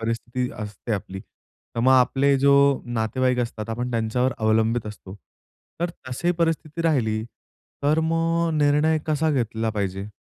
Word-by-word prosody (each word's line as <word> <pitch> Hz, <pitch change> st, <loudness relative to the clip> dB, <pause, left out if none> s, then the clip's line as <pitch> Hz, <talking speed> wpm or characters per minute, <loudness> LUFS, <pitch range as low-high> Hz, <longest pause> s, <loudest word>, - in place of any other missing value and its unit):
परिस्थिती 120 Hz, +2 st, -2 dB
असते 105 Hz, +2 st, -5 dB
आपली. 95 Hz, -1 st, -4 dB
तर 115 Hz, -, -11 dB
मग 130 Hz, +2 st, +4 dB
आपले 135 Hz, +2 st, +4 dB
जो 140 Hz, +1 st, +4 dB, 0.3 s
नातेवाईक 120 Hz, +2 st, 0 dB
असतात 115 Hz, -2 st, -3 dB
आपण 120 Hz, +2 st, -3 dB
त्यांच्यावर 120 Hz, +3 st, 0 dB
अवलंबित 110 Hz, +1 st, +1 dB
असतो 100 Hz, -2 st, -9 dB, 0.7 s
तर 175 Hz, 0 st, 0 dB, 0.2 s
तशी 170 Hz, +8 st, -1 dB
परिस्थिती 165 Hz, -1 st, -1 dB
राहिली 110 Hz, -9 st, +1 dB, 0.6 s
तर 150 Hz, +3 st, +3 dB
मग 165 Hz, +1 st, +1 dB
निर्णय 150 Hz, +2 st, +3 dB
कसा 155 Hz, +1 st, +1 dB
घेतला 115 Hz, -4 st, -1 dB
पाहिजे? 100 Hz, -1 st, -3 dB
125 Hz, 135 wpm, -24 LUFS, 110-150 Hz, 0.7 s, मग